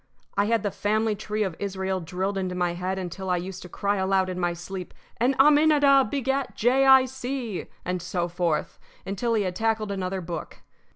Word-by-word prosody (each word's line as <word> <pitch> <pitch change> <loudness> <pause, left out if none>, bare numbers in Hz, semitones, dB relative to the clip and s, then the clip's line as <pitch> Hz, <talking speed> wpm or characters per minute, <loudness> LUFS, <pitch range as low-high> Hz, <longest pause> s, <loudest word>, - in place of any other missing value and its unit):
I 200 - +2
had 225 0 +1
the 205 - -1
family 215 +2 0
tree 215 +1 -2
of 190 -5 -3
Israel 190 -1 -2
drilled 185 +4 -3
into 185 -2 -2
my 175 -1 0
head 185 +2 -3
until 190 +1 -5
I 180 - +2
used 185 +1 -6
to 180 - -10
cry 200 +4 -1
aloud 190 0 +1
in 180 0 -4
my 175 -1 0
sleep: 180 +1 -7 0.2
"And 250 +4 +2
Aminadab 290 -3 +5
begat 270 0 -1
Jay 260 +4 +3
Eye 265 -1 +8
See," 255 -5 -4 0.2
and 180 0 -2
so 175 0 -2
forth, 175 -2 -1 0.3
until 225 +4 -1
he 210 - +2
had 180 -2 -3
tackled 220 -1 0
another 190 -1 -2
book. 170 -1 -7
195 Hz, 190 wpm, -26 LUFS, 180-235 Hz, 0.3 s, Eye